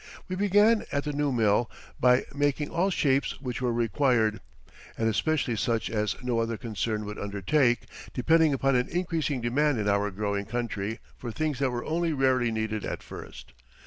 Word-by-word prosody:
We 185 Hz, -, -3 dB
began 205 Hz, +3 st, +4 dB
at 140 Hz, 0 st, 0 dB
the 150 Hz, -, -3 dB
new 145 Hz, 0 st, 0 dB
mill 115 Hz, -1 st, +2 dB, 0.3 s
by 125 Hz, 0 st, +4 dB
making 145 Hz, +1 st, 0 dB
all 180 Hz, +4 st, +1 dB
shapes 140 Hz, -6 st, +1 dB
which 130 Hz, -2 st, -4 dB
were 125 Hz, -1 st, +1 dB
required, 115 Hz, -1 st, +1 dB, 0.6 s
and 110 Hz, -, +1 dB
especially 125 Hz, +2 st, +1 dB
such 115 Hz, +1 st, -1 dB
as 105 Hz, -1 st, 0 dB
no 120 Hz, -2 st, 0 dB
other 115 Hz, 0 st, -1 dB
concern 110 Hz, -1 st, -3 dB
would 105 Hz, +1 st, -6 dB
undertake, 120 Hz, +6 st, +1 dB, 0.3 s
depending 160 Hz, +4 st, +3 dB
upon 135 Hz, 0 st, +2 dB
an 125 Hz, +1 st, +1 dB
increasing 160 Hz, -6 st, -1 dB
demand 135 Hz, +4 st, +1 dB
in 105 Hz, -, -1 dB
our 100 Hz, 0 st, +2 dB
growing 100 Hz, 0 st, -2 dB
country 110 Hz, -2 st, -3 dB, 0.2 s
for 120 Hz, -, -6 dB
things 150 Hz, +1 st, -2 dB
that 135 Hz, -2 st, +2 dB
were 120 Hz, -1 st, -4 dB
only 165 Hz, +1 st, 0 dB
rarely 130 Hz, -4 st, +2 dB
needed 110 Hz, -1 st, -2 dB
at -, -, -4 dB
first. -, -, -10 dB
125 Hz, 175 wpm, -27 LUFS, 110-145 Hz, 0.6 s, began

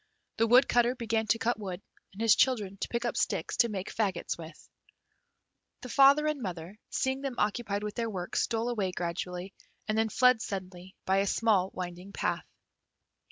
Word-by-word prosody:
The 225 Hz, -, +3 dB
Woodcutter 245 Hz, 0 st, +4 dB
began 225 Hz, -2 st, -1 dB
to 225 Hz, -, +3 dB
cut 230 Hz, 0 st, -1 dB
wood, 185 Hz, -4 st, -5 dB, 0.3 s
and 205 Hz, +4 st, -5 dB
his 225 Hz, -, +6 dB
children 210 Hz, -7 st, +1 dB
to -, -, -3 dB
pick 235 Hz, 0 st, -2 dB
up 240 Hz, -, -1 dB
sticks -, -, -1 dB
to 235 Hz, -, +4 dB
make 195 Hz, -2 st, -5 dB
faggots 195 Hz, -6 st, -1 dB
with. 165 Hz, -1 st, -12 dB, 1.1 s
The 250 Hz, -, -8 dB
father 280 Hz, +3 st, +6 dB
and 305 Hz, -3 st, -1 dB
mother, 180 Hz, 0 st, -6 dB
seeing 265 Hz, +1 st, -1 dB
them 275 Hz, -3 st, -3 dB
occupied 210 Hz, -1 st, -1 dB
with 210 Hz, -1 st, -4 dB
their 230 Hz, 0 st, -2 dB
work, 180 Hz, -4 st, -5 dB
stole 230 Hz, +1 st, 0 dB
away 200 Hz, -6 st, -1 dB
gradually, 180 Hz, +2 st, -4 dB, 0.3 s
and 215 Hz, -, 0 dB
then 220 Hz, 0 st, +2 dB
fled 250 Hz, 0 st, +4 dB
suddenly 185 Hz, -2 st, -6 dB
by 190 Hz, +1 st, +2 dB
a 200 Hz, +1 st, +2 dB
small 200 Hz, -4 st, +2 dB
winding 180 Hz, +2 st, -6 dB
path. -, -, -2 dB
215 Hz, 175 wpm, -30 LUFS, 185-240 Hz, 1.1 s, his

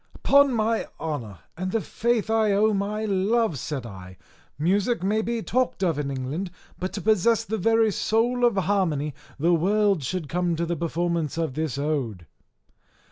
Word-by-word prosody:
"Upon 280 Hz, 0 st, +4 dB
my 225 Hz, 0 st, 0 dB
honour, 120 Hz, -, -5 dB
and 185 Hz, +2 st, -3 dB
the 225 Hz, -, +1 dB
faith 225 Hz, 0 st, -1 dB
I 220 Hz, -2 st, +3 dB
owe 215 Hz, +2 st, +3 dB
my 205 Hz, +2 st, -1 dB
love," 200 Hz, -, +1 dB
said 130 Hz, +1 st, -4 dB
I, 95 Hz, -4 st, -10 dB, 0.4 s
"music 195 Hz, -, +1 dB
may 210 Hz, +3 st, +1 dB
be 230 Hz, 0 st, -2 dB
talked 255 Hz, -4 st, 0 dB
of 165 Hz, -5 st, +1 dB
in 140 Hz, -1 st, -2 dB
England, 140 Hz, +8 st, -3 dB, 0.3 s
but 185 Hz, +1 st, -3 dB
to 200 Hz, -, -4 dB
possess 220 Hz, +2 st, +3 dB
the 220 Hz, +2 st, -3 dB
very 225 Hz, +2 st, +3 dB
soul 240 Hz, +5 st, +1 dB
of 240 Hz, -3 st, +4 dB
harmony 180 Hz, -7 st, 0 dB, 0.2 s
the 165 Hz, +4 st, +2 dB
world 200 Hz, +1 st, +2 dB
should 165 Hz, +3 st, -3 dB
come 175 Hz, +2 st, 0 dB
to 170 Hz, +1 st, -1 dB
the 170 Hz, +1 st, -2 dB
performance 170 Hz, -1 st, -1 dB
of 160 Hz, -5 st, -1 dB
this 155 Hz, -2 st, -2 dB
ode." 135 Hz, -, -2 dB
185 Hz, 170 wpm, -25 LUFS, 155-220 Hz, 0.4 s, Upon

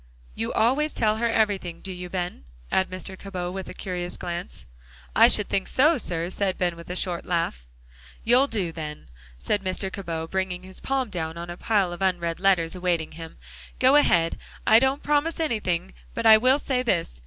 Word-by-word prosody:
"You 115 Hz, -, -3 dB
always 275 Hz, +7 st, +2 dB
tell 215 Hz, -1 st, +1 dB
her 235 Hz, +1 st, +1 dB
everything, 200 Hz, -6 st, 0 dB
do 190 Hz, -, -6 dB
you, 180 Hz, 0 st, -7 dB
Ben?" 175 Hz, -, -4 dB, 0.3 s
asked 190 Hz, -, +2 dB
Mr. 185 Hz, +1 st, -6 dB
Cabot 185 Hz, -2 st, -5 dB
with 190 Hz, -1 st, -6 dB
a -, -, -7 dB
curious 180 Hz, -1 st, -4 dB
glance. 175 Hz, 0 st, -6 dB, 0.5 s
"I 230 Hz, -, +8 dB
should 210 Hz, -4 st, +3 dB
think 195 Hz, -, -1 dB
so, 305 Hz, +3 st, +3 dB
sir," 170 Hz, -3 st, -3 dB
said 190 Hz, -1 st, -1 dB
Ben, 175 Hz, -2 st, 0 dB
with 170 Hz, +1 st, -12 dB
a 180 Hz, -, -3 dB
short 180 Hz, -2 st, -1 dB
laugh. 165 Hz, -, -2 dB, 0.6 s
"You'll 250 Hz, +4 st, +4 dB
do, 200 Hz, -9 st, -1 dB
then," 150 Hz, -, -7 dB, 0.3 s
said 200 Hz, -, -1 dB
Mr. 190 Hz, +1 st, -1 dB
Cabot, 165 Hz, -4 st, -5 dB
bringing 190 Hz, -1 st, -2 dB
his 190 Hz, 0 st, -8 dB
palm 265 Hz, -4 st, -1 dB
down 160 Hz, -3 st, -3 dB
on 170 Hz, +1 st, -6 dB
a -, -, -6 dB
pile 200 Hz, -5 st, +1 dB
of 175 Hz, -, -9 dB
unread 175 Hz, -3 st, 0 dB
letters 180 Hz, -4 st, +2 dB
awaiting 175 Hz, -3 st, -1 dB
him. 165 Hz, 0 st, -10 dB, 0.4 s
"Go 260 Hz, +2 st, +5 dB
ahead. 170 Hz, -, +3 dB, 0.3 s
I 220 Hz, -, +7 dB
don't 265 Hz, +3 st, +1 dB
promise 295 Hz, +3 st, +1 dB
anything, 190 Hz, -, -1 dB, 0.2 s
but 230 Hz, -, -3 dB
I 220 Hz, -1 st, +10 dB
will 255 Hz, +5 st, +4 dB
say 260 Hz, -3 st, -1 dB
this. 175 Hz, -, -1 dB
185 Hz, 190 wpm, -25 LUFS, 175-225 Hz, 0.6 s, I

